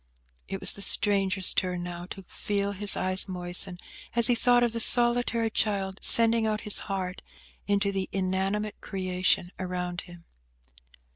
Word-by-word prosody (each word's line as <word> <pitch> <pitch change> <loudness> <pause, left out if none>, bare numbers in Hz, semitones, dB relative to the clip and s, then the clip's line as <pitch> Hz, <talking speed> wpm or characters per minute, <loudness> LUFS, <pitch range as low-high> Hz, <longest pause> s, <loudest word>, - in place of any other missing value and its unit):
It 195 - -7
was - - 0
the 200 - -10
stranger's 195 -1 +2
turn 180 -1 -3
now 175 0 -8
to 195 +1 -11
feel 200 +2 -4
his 200 0 +2
eyes 185 +1 +2
moisten, 180 0 +5 0.4
as 235 -1 +7
he 245 - +4
thought 245 +1 +1
of 235 -2 -1
the 230 - -4
solitary 240 -1 +2
child 195 -3 -3
sending 230 -1 +3
out 215 -1 -3
his 210 - 0
heart 185 -2 -5 0.5
into 200 0 -1
the 195 -1 -5
inanimate 195 +3 -4
creation 185 -1 -2
around 180 -1 -5
him. 175 -1 -16
195 Hz, 150 wpm, -25 LUFS, 185-215 Hz, 0.5 s, as